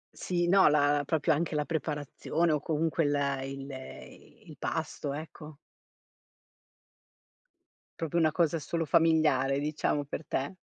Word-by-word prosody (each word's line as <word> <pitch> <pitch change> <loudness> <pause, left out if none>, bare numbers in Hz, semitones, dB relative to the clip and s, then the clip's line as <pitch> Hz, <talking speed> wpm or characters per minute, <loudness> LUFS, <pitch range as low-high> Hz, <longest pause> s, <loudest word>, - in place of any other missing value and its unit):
Sì, 175 -1 -1
no, 190 +1 +6
la 145 -1 +3
proprio 160 0 +2
anche 160 +1 -1
la 150 -1 0
preparazione 155 +2 -1
o 150 - +2
comunque 160 +2 0
il 140 -2 0
il 135 0 -7 0.7
il - - -12
pasto, 145 - -3
ecco. 150 0 -8 2.4
Proprio 165 +1 -2
una 155 -1 +3
cosa 165 0 +1
solo 165 +2 -2
familiare, 155 -5 +3
diciamo, 150 0 -1
per 145 +2 -6
te? 135 +7 -2
150 Hz, 125 wpm, -29 LUFS, 145-165 Hz, 2.4 s, no